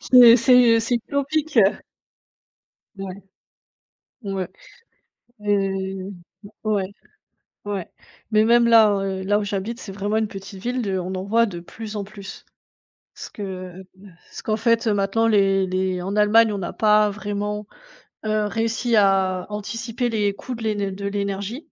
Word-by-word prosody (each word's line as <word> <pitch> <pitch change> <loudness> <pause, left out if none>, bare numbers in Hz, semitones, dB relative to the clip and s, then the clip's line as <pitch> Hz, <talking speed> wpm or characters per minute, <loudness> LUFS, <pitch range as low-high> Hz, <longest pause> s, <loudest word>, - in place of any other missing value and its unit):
C'est 240 -2 +10
c'est 235 -1 +5
c'est 235 +2 -1
utopique, 280 +4 -2
heu. 195 -1 +4 1.2
Ouais. 190 -1 -5 1.1
Ouais. 195 -2 -3 0.9
Heu. 195 -1 -1 0.5
Ouais. 210 -3 0 0.8
Ouais, 200 -4 -4 0.4
mais 215 0 +4
même, 235 +1 +5
là, 225 -2 +7
heu, 190 -1 -3
là 205 +2 +2
où 210 - -2
j'habite, 205 +3 -3
c'est 195 - -8
vraiment 205 +2 -2
une 220 -2 0
petite 195 0 -9
ville 250 +3 -2
de 195 -3 -1
on 185 +1 -4
en 185 - -4
voit 230 +3 +3
de 175 -5 -6
plus 215 +4 -8
en 200 - -4
plus. 200 -2 -11 0.7
Ce - - -9
que 185 -2 -7 0.5
ce - - -9
qu'en 215 0 -1
fait 230 +1 +2
maintenant, 205 +2 +1
les 195 -3 +3
les 185 -1 -1
en 195 +2 -3
Allemagne, 210 +1 +4
on 200 - -3
n'a 175 - -5
pas 210 -1 +4
vraiment, 205 0 -4 0.6
heu, 215 -1 0
réussi 230 +2 -1
à 190 -2 +2
anticiper 225 +3 -3
les 210 -3 +1
coûts 255 - -7
de 235 - -7
l'én 205 -3 -1
de 200 +1 -5
l'énergie. 200 +4 -3
205 Hz, 150 wpm, -22 LUFS, 195-225 Hz, 1.2 s, C'est